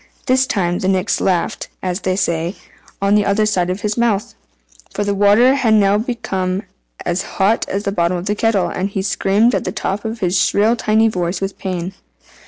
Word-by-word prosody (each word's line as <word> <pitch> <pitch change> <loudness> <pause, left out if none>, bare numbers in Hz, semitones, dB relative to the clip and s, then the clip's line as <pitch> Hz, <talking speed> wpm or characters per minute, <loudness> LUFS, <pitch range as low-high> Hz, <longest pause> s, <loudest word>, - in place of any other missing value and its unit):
This 260 +1 +2
time 175 -6 0
the 185 - -2
Nix 190 +1 +1
laughed 180 -3 -1 0.2
(as 180 0 -2
they 185 -1 0
say) 170 -1 -1 0.5
on 200 +1 +3
the 210 0 +4
other 200 +2 +2
side 180 -4 0
of 185 +2 -3
his 210 +1 -2
mouth; 215 -4 0 0.6
for 205 - 0
the 205 0 0
water 205 +6 +5
had 245 -6 +2
now 200 0 +3
become 195 -5 -2 0.4
as 175 +1 0 0.2
hot 205 +4 +2
as 195 +1 -2
the 200 - -1
bottom 175 -1 0
of 175 - -6
the 205 - 0
kettle, 205 -4 +1
and 185 +3 -2
he 195 -1 -3
screamed 205 +4 +2
at - - 0
the - - -3
top 195 +2 -3
of 225 +1 -4
his 180 -1 +1
shrill 215 +6 +3
tiny 220 -1 +2
voice 180 -3 -2
with 195 0 -4
pain. 185 -1 -4
200 Hz, 200 wpm, -18 LUFS, 185-215 Hz, 0.6 s, water